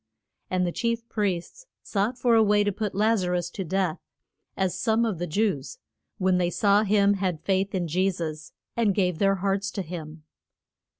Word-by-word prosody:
And 185 -1 +1
the 175 - -1
chief 230 +3 -2
priests 205 - -3 0.2
sought 215 +5 -1
for 240 -1 +2
a 225 - +6
way 210 -1 +4
to 205 - +1
put 205 0 -3
Laz 215 +1 +3
a 180 - -1
rus 175 -1 -1
to 195 - -4
death, 185 -1 -1 0.6
as 190 -2 +1
some 225 +3 +2
of 205 -7 -2
the 175 - -2
Jews, 180 -5 -1 0.4
when 185 -1 +2
they 175 -1 +1
saw 200 +2 +3
him 205 -1 +3
had 185 -5 -1
faith 195 0 0
in 175 -2 -1
Je 185 +5 +2
sus, 155 -4 -5 0.2
and 220 -5 +2
gave 180 -4 +1
their 195 -1 +3
hearts 195 +1 -1
to 195 - -4
him. 160 -2 -8
195 Hz, 190 wpm, -26 LUFS, 180-210 Hz, 0.6 s, a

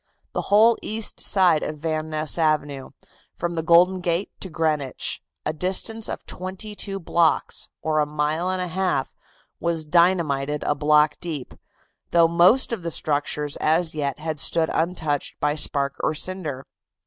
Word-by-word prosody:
The - - -1
whole 220 +3 +6
east 220 0 -3
side 185 -6 +4
of 150 - -4
Van 155 0 -3
Ness 155 +1 0
Avenue, 145 -4 0 0.5
from 175 0 -3
the 165 - -2
Golden 175 +3 +4
Gate 175 +2 -1
to 190 - -5
Greenwich, 155 -5 -2 0.2
a 155 - -1
distance 190 +7 -2
of - - -6
twenty 190 +4 -6
two 195 -1 -4
blocks, 170 -2 +1
or 155 -1 +1
a 150 - +1
mile 150 +4 -1
and 185 -1 -1
a - - -3
half, 180 -6 -1 0.5
was 165 -2 -1
dynamited 150 -4 +2
a - - +1
block 150 +1 +3
deep, 155 -7 -5 0.6
though 170 -1 +5
most 175 +10 +4
of 220 - -3
the 170 - -3
structures 150 -1 -1
as 160 +1 +1
yet 140 -4 -2
had 155 -1 -4
stood 160 +2 +2
untouched 160 -4 -2
by 150 0 +1
spark 140 -2 +1
or 155 - 0
cinder. 155 -5 -2
160 Hz, 160 wpm, -23 LUFS, 150-180 Hz, 0.6 s, whole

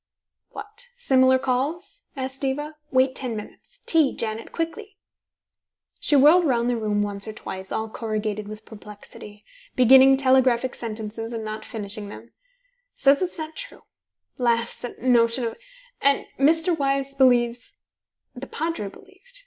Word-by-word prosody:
"What? 430 +4 -10
Similar 260 - +4
calls?" 290 - -3
asked 265 0 -5
Diva. 295 +3 -2
"Wait 260 0 +3
ten 255 -3 -4
minutes. 220 - -11
Tea, 315 -5 +2
Janet. 225 0 -4
Quickly." 390 +5 -5 1.0
She 295 - +2
whirled 310 +5 +6
round 240 -3 +1
the - - 0
room 210 -2 0
once 200 0 -2
or 215 - -5
twice, 190 -2 -8
all 220 - -2
corrugated 215 -2 -3
with 215 +1 -9
perplexity, 210 -1 -13 0.3
beginning 265 +2 +7
telegraphic 260 -2 +3
sentences, 225 0 -6
and 225 -1 -4
not 215 0 -5
finishing 205 -1 -7
them: 230 +3 -11 0.6
"Says 280 +3 +4
it's 365 -1 -3
not 315 0 -6
true - - -8 0.6
laughs 235 -1 0
at 245 - -8
notion 240 -1 +3
of 230 - -3 0.5
And 280 0 +2
Mr. 325 +5 +3
Wyse 275 -2 -1
believes 245 -3 +2 0.6
The 260 +2 -8
Padre 320 -10 -3
believed. 400 - -18
255 Hz, 140 wpm, -24 LUFS, 220-290 Hz, 1.0 s, beginning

